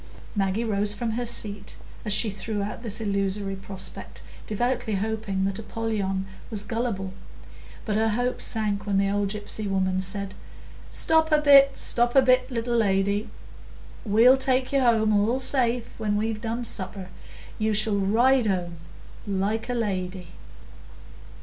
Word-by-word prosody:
Maggie 195 Hz, +2 st, 0 dB
rose 205 Hz, -2 st, 0 dB
from 230 Hz, +2 st, -2 dB
her 240 Hz, +2 st, -2 dB
seat 205 Hz, -3 st, -3 dB, 0.3 s
as 210 Hz, -, +1 dB
she 215 Hz, +1 st, +3 dB
threw 205 Hz, +1 st, -3 dB
out 210 Hz, +3 st, -5 dB
this 225 Hz, -3 st, -2 dB
illusory 200 Hz, -1 st, -1 dB
prospect, 190 Hz, 0 st, -8 dB, 0.2 s
devoutly 240 Hz, 0 st, -1 dB
hoping 200 Hz, -2 st, -2 dB
that 195 Hz, +1 st, -2 dB
Apollyon 210 Hz, -4 st, -2 dB, 0.2 s
was 210 Hz, -3 st, -3 dB
gullible; 205 Hz, -3 st, -3 dB, 0.7 s
but 210 Hz, -, -1 dB
her 225 Hz, 0 st, +2 dB
hope 245 Hz, +3 st, -1 dB
sank 210 Hz, -2 st, -1 dB
when 200 Hz, -1 st, +1 dB
the 195 Hz, 0 st, +2 dB
old 205 Hz, 0 st, 0 dB
gypsy 210 Hz, 0 st, -3 dB
woman 185 Hz, -1 st, 0 dB
said, 195 Hz, +1 st, -2 dB, 0.6 s
"Stop 320 Hz, 0 st, +3 dB
a 305 Hz, -, +6 dB
bit, 275 Hz, -2 st, +6 dB
stop 240 Hz, +1 st, +1 dB
a 270 Hz, -, +8 dB
bit, 255 Hz, 0 st, +3 dB
little 240 Hz, -1 st, -2 dB
lady; 200 Hz, 0 st, +1 dB, 0.7 s
we'll 235 Hz, +5 st, +5 dB
take 260 Hz, 0 st, 0 dB
you 275 Hz, -, +4 dB
home, 225 Hz, -4 st, +3 dB
all 210 Hz, +5 st, +2 dB
safe, 250 Hz, -3 st, +1 dB
when 210 Hz, -2 st, 0 dB
we've 215 Hz, 0 st, -2 dB
done 235 Hz, +1 st, -3 dB
supper; 190 Hz, -2 st, -1 dB, 0.5 s
you 220 Hz, 0 st, +1 dB
shall 215 Hz, 0 st, +2 dB
ride 235 Hz, +5 st, +3 dB
home, 175 Hz, -3 st, -2 dB, 0.5 s
like 205 Hz, +4 st, -1 dB
a 245 Hz, -, -1 dB
lady." 185 Hz, -5 st, -3 dB
215 Hz, 150 wpm, -25 LUFS, 195-235 Hz, 0.7 s, a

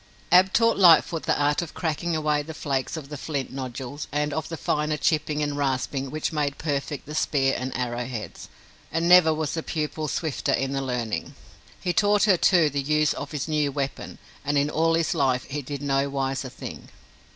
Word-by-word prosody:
Ab 185 Hz, +2 st, +6 dB
taught 230 Hz, +1 st, +3 dB
Lightfoot 170 Hz, -2 st, +5 dB
the -, -, +2 dB
art 145 Hz, +2 st, +2 dB
of 170 Hz, -, -7 dB
cracking 165 Hz, 0 st, -1 dB
away 150 Hz, -1 st, +1 dB
the 160 Hz, +2 st, -8 dB
flakes 140 Hz, 0 st, -2 dB
of 145 Hz, -3 st, -8 dB
the 150 Hz, -2 st, -7 dB
flint 140 Hz, -3 st, -3 dB
nodules 130 Hz, +2 st, -6 dB
and 150 Hz, 0 st, -1 dB
of 155 Hz, +1 st, -3 dB
the 165 Hz, -, -5 dB
finer 150 Hz, 0 st, 0 dB
chipping 150 Hz, 0 st, 0 dB
and 145 Hz, -1 st, -2 dB
rasping 135 Hz, -1 st, -1 dB
which 155 Hz, +2 st, -3 dB
made 145 Hz, -2 st, -1 dB
perfect 145 Hz, -1 st, -3 dB
the 150 Hz, -, -8 dB
spear 135 Hz, -3 st, +1 dB
and 130 Hz, +1 st, -3 dB
arrowheads, 120 Hz, -2 st, -4 dB, 0.4 s
and 165 Hz, +1 st, 0 dB
never 175 Hz, -2 st, +7 dB
was 155 Hz, -1 st, -2 dB
pupil 155 Hz, 0 st, -2 dB
swifter 155 Hz, 0 st, -1 dB
in 135 Hz, 0 st, 0 dB
the 135 Hz, 0 st, -1 dB
learning. 125 Hz, -4 st, -3 dB, 0.4 s
He 180 Hz, -, -1 dB
taught 205 Hz, +1 st, +3 dB
her, 200 Hz, -3 st, +5 dB
too, 170 Hz, -3 st, +4 dB
the 140 Hz, 0 st, -1 dB
use 150 Hz, +2 st, +2 dB
of 145 Hz, -, -6 dB
his 150 Hz, -2 st, -4 dB
new 150 Hz, -2 st, +1 dB
weapon, 140 Hz, -1 st, -4 dB, 0.3 s
and 145 Hz, 0 st, 0 dB
in 145 Hz, +1 st, +1 dB
all 165 Hz, +1 st, +2 dB
his 165 Hz, -1 st, +1 dB
life 130 Hz, -2 st, +1 dB
he 145 Hz, +2 st, -5 dB
did 140 Hz, +1 st, -6 dB
no 140 Hz, 0 st, +1 dB
wiser 135 Hz, -1 st, -2 dB
thing! 125 Hz, -, -9 dB
145 Hz, 195 wpm, -25 LUFS, 135-160 Hz, 0.4 s, never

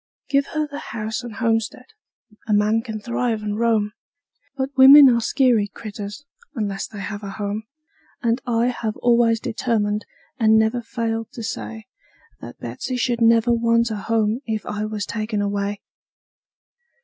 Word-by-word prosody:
Give 275 Hz, 0 st, +2 dB
her 305 Hz, 0 st, +1 dB
the 290 Hz, 0 st, -7 dB
house 220 Hz, 0 st, -4 dB
and 240 Hz, -3 st, -8 dB
homestead 225 Hz, +2 st, -1 dB, 0.6 s
a 215 Hz, -, +1 dB
man 210 Hz, +2 st, +3 dB
can 220 Hz, -1 st, -6 dB
thrive 235 Hz, 0 st, -2 dB
and 210 Hz, 0 st, -3 dB
roam; 220 Hz, -3 st, +2 dB, 0.7 s
But 270 Hz, +1 st, -3 dB
women 275 Hz, +2 st, +10 dB
are 235 Hz, -1 st, +2 dB
skeery 240 Hz, -4 st, +2 dB
critters, 205 Hz, +5 st, -8 dB, 0.3 s
unless 200 Hz, -4 st, -3 dB
they 205 Hz, -, -9 dB
have 205 Hz, +1 st, -5 dB
a 200 Hz, -, -6 dB
home; 205 Hz, +2 st, -4 dB, 0.6 s
And 235 Hz, +2 st, +1 dB
I 235 Hz, 0 st, +2 dB
have 225 Hz, -3 st, -3 dB
always 235 Hz, -1 st, +3 dB
determined, 215 Hz, -2 st, -1 dB, 0.3 s
and 220 Hz, -1 st, +5 dB
never 220 Hz, +2 st, +2 dB
failed 225 Hz, -1 st, -3 dB
to 230 Hz, -, -7 dB
say, 220 Hz, 0 st, -6 dB, 0.5 s
That -, -, -10 dB
Betsey 255 Hz, -, -5 dB, 0.2 s
never 230 Hz, 0 st, +4 dB
should 235 Hz, -1 st, +1 dB
want 230 Hz, 0 st, +2 dB
a 215 Hz, -, -2 dB
home 220 Hz, +2 st, 0 dB
if 220 Hz, -1 st, -2 dB
I 210 Hz, 0 st, -3 dB
was 215 Hz, -1 st, -3 dB
taken 215 Hz, -1 st, -3 dB
away. 200 Hz, 0 st, -2 dB
225 Hz, 155 wpm, -22 LUFS, 210-235 Hz, 0.7 s, women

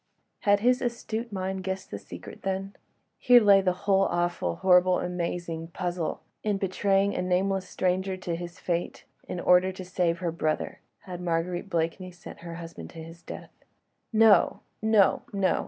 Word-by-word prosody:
Had 205 Hz, 0 st, +3 dB
his 250 Hz, +2 st, +3 dB
astute 235 Hz, -1 st, -3 dB
mind 190 Hz, -1 st, -3 dB
guessed 190 Hz, 0 st, -4 dB
the 100 Hz, -, -5 dB
secret, 90 Hz, -1 st, -10 dB
then? 195 Hz, +1 st, -3 dB, 0.4 s
Here 245 Hz, -1 st, +7 dB
lay 200 Hz, -3 st, +6 dB
the 185 Hz, -1 st, +1 dB
whole 195 Hz, -1 st, +4 dB
awful, 175 Hz, -, -1 dB
horrible, 180 Hz, -, +4 dB
amazing 170 Hz, -2 st, -3 dB
puzzle. 175 Hz, -1 st, -3 dB, 0.2 s
In 210 Hz, -2 st, +1 dB
betraying 195 Hz, +1 st, +1 dB
a -, -, -1 dB
nameless 185 Hz, +1 st, 0 dB
stranger 185 Hz, +1 st, 0 dB
to 180 Hz, -2 st, -3 dB
his 175 Hz, +2 st, -7 dB
fate 175 Hz, -1 st, -3 dB, 0.2 s
in 180 Hz, -, -4 dB
order 180 Hz, +1 st, +4 dB
to 185 Hz, 0 st, -8 dB
save 175 Hz, -2 st, 0 dB
her 170 Hz, -1 st, -2 dB
brother, 155 Hz, -2 st, -2 dB, 0.2 s
had 180 Hz, -2 st, -8 dB
Marguerite 175 Hz, +2 st, -2 dB
Blakeney 170 Hz, +2 st, -1 dB
sent 180 Hz, 0 st, -12 dB
her 170 Hz, -1 st, -8 dB
husband 165 Hz, 0 st, -9 dB
to 160 Hz, -, -9 dB
his 165 Hz, +1 st, -12 dB
death? -, -, -9 dB, 0.6 s
No! 220 Hz, -2 st, +5 dB, 0.2 s
no! 220 Hz, -3 st, +4 dB
no! 195 Hz, -2 st, +2 dB
185 Hz, 160 wpm, -27 LUFS, 175-195 Hz, 0.6 s, Here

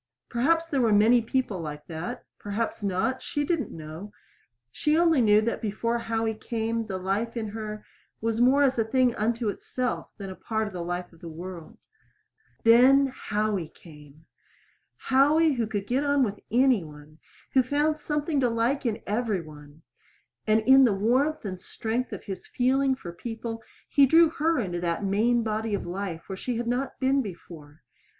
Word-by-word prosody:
Perhaps 325 Hz, +8 st, +2 dB
there 280 Hz, -5 st, 0 dB
were 230 Hz, -2 st, +3 dB
many 220 Hz, +4 st, +5 dB
people 230 Hz, -4 st, -1 dB
like 150 Hz, -2 st, -7 dB
that 160 Hz, +1 st, -6 dB
perhaps 215 Hz, +3 st, -3 dB
not; 200 Hz, +6 st, -1 dB
she 290 Hz, -, -2 dB
did 335 Hz, +2 st, 0 dB
not 250 Hz, -, -4 dB
know. 160 Hz, +6 st, -9 dB, 0.6 s
She 300 Hz, +1 st, +1 dB
only 330 Hz, -5 st, +4 dB
knew 210 Hz, -2 st, +5 dB
that 230 Hz, +2 st, -2 dB
before 230 Hz, +2 st, -1 dB
Howie 225 Hz, -1 st, -1 dB
came 225 Hz, 0 st, -3 dB
the 190 Hz, -, -3 dB
life 200 Hz, +6 st, -2 dB
in 220 Hz, -2 st, -3 dB
her 215 Hz, 0 st, -6 dB, 0.3 s
was 225 Hz, +1 st, -1 dB
more 270 Hz, +4 st, +5 dB
as 265 Hz, -3 st, +2 dB
a -, -, +4 dB
thing 250 Hz, +2 st, +2 dB
unto 230 Hz, +1 st, -1 dB
itself 250 Hz, +4 st, -3 dB
than 195 Hz, -2 st, -7 dB
a -, -, -8 dB
part 220 Hz, +2 st, -2 dB
of 210 Hz, -, -7 dB
the 180 Hz, -, -4 dB
life 175 Hz, +1 st, -4 dB
of 165 Hz, -, -19 dB
the 170 Hz, -, -8 dB
world. 175 Hz, +5 st, -9 dB, 0.9 s
Then 255 Hz, +4 st, +6 dB
Howie 210 Hz, -5 st, -1 dB
came! 150 Hz, -1 st, -16 dB, 0.7 s
Howie, 295 Hz, +4 st, +3 dB
who 235 Hz, -4 st, -1 dB
could 205 Hz, -2 st, -3 dB
get 255 Hz, +6 st, 0 dB
on 285 Hz, -1 st, +3 dB
with 205 Hz, -4 st, -2 dB
any 250 Hz, -4 st, +3 dB
one, 150 Hz, 0 st, -14 dB, 0.3 s
who 265 Hz, -, +6 dB
found 295 Hz, +4 st, 0 dB
something 295 Hz, 0 st, -1 dB
to 250 Hz, -2 st, +2 dB
like 240 Hz, +4 st, 0 dB
in 220 Hz, -, -3 dB
every 210 Hz, -3 st, -1 dB
one; 150 Hz, 0 st, -14 dB, 0.6 s
and 215 Hz, +1 st, +4 dB
in 265 Hz, +4 st, +7 dB
the 235 Hz, -5 st, +4 dB
warmth 255 Hz, +9 st, +1 dB
and 185 Hz, -2 st, -5 dB
strength 230 Hz, +6 st, -3 dB
of -, -, -7 dB
his 195 Hz, -2 st, -7 dB
feeling 265 Hz, +2 st, +1 dB
for 175 Hz, -9 st, -9 dB
people 225 Hz, +3 st, -6 dB, 0.3 s
he 280 Hz, -1 st, +5 dB
drew 325 Hz, +3 st, +6 dB
her 325 Hz, +1 st, +1 dB
into 180 Hz, -7 st, -2 dB
that 170 Hz, +3 st, -1 dB
main 230 Hz, +5 st, +2 dB
body 220 Hz, -1 st, -1 dB
of -, -, -5 dB
life 175 Hz, -2 st, -5 dB
where 190 Hz, -, -5 dB
she 240 Hz, +5 st, -3 dB
had 240 Hz, -, -2 dB
not 250 Hz, +3 st, -2 dB
been 270 Hz, +1 st, +2 dB
before. 165 Hz, -, -10 dB
225 Hz, 180 wpm, -26 LUFS, 195-260 Hz, 0.9 s, in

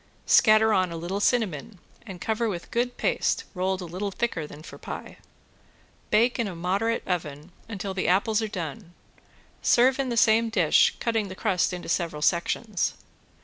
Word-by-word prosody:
Scatter 215 Hz, 0 st, +5 dB
on 185 Hz, -3 st, +1 dB
a 165 Hz, -, -5 dB
little 175 Hz, +4 st, -3 dB
cinnamon 205 Hz, -, 0 dB, 0.3 s
and 190 Hz, -3 st, -8 dB
cover 225 Hz, +3 st, -1 dB
with 175 Hz, -4 st, -6 dB
good 245 Hz, +1 st, -1 dB
paste -, -, 0 dB
rolled 185 Hz, 0 st, -1 dB
a -, -, -5 dB
little 185 Hz, +4 st, -4 dB
thicker 190 Hz, -7 st, -3 dB
than 150 Hz, +1 st, -12 dB
for -, -, -11 dB
pie. -, -, -8 dB, 0.9 s
Bake 235 Hz, +4 st, +2 dB
in 230 Hz, -, 0 dB
a 185 Hz, -, -6 dB
moderate 195 Hz, +7 st, -1 dB
oven 155 Hz, -2 st, -4 dB, 0.2 s
until 200 Hz, -2 st, -4 dB
the 190 Hz, -, -2 dB
apples 205 Hz, +4 st, +2 dB
are 220 Hz, -, -1 dB
done, 180 Hz, -1 st, -7 dB, 0.7 s
serve 255 Hz, +3 st, +4 dB
in 270 Hz, -2 st, 0 dB
the 235 Hz, -, -2 dB
same 225 Hz, 0 st, +4 dB
dish, 225 Hz, -, +3 dB
cutting 225 Hz, -3 st, 0 dB
the 185 Hz, -, -8 dB
crust 190 Hz, -3 st, 0 dB
into 180 Hz, -1 st, -6 dB
several 165 Hz, -3 st, -1 dB
sections. 180 Hz, +5 st, 0 dB
195 Hz, 170 wpm, -26 LUFS, 175-225 Hz, 0.9 s, Scatter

